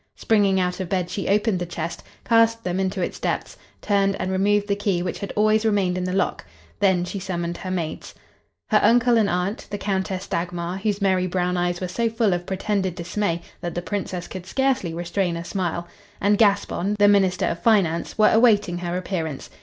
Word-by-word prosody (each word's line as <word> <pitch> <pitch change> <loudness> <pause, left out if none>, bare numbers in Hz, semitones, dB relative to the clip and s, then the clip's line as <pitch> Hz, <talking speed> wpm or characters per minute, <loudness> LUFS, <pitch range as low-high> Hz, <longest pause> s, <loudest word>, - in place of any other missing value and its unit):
Springing 200 -3 +2
out 180 0 -1
of 185 -3 -4
bed, 180 -2 -1
she 195 - -3
opened 210 -1 +2
the 175 - -2
chest, 170 -1 -5 0.2
cast 230 0 +3
them 180 +1 -1
into 190 -1 -1
its - - -4
depths, - - -2 0.3
turned 195 -1 +2
and 185 +1 -2
removed 205 +2 +2
the 200 - +1
key 200 -4 0
which 180 - -4
had 200 - -5
always 215 +1 +3
remained 200 -5 +1
in 180 - -2
the 185 - -2
lock. 190 0 -1 0.4
Then 190 -3 +3
she 195 +2 -5
summoned 175 -2 -3
her 185 - -6
maids. 170 -4 -4 0.5
Her - - +5
uncle 240 +1 +4
and 215 -3 +3
aunt, 180 +4 -2
the 205 - -3
Countess 190 -1 -2
Dagmar 175 +1 -3
(whose 205 0 -1
merry 185 -1 +2
brown 180 0 0
eyes 175 0 0
were 185 - -3
so 230 +6 0
full 225 -3 +1
of 175 0 -3
pretended 190 -1 -1
dismay 175 -1 -2 0.2
that 175 -1 -5
the 175 - -3
Princess 185 -3 -4
could 185 -1 -8
scarcely 265 -8 0
restrain 175 +1 -2
a 170 - -6
smile), 175 -2 -3 0.3
and 205 +1 +2
Gaspon, 200 -2 +2
the 205 0 +5
minister 195 -3 +3
of 170 - -2
finance, 190 -7 +2
were 215 - +5
awaiting 210 -6 +3
her 175 0 -3
appearance. 165 -6 -4
190 Hz, 200 wpm, -23 LUFS, 175-205 Hz, 0.5 s, Her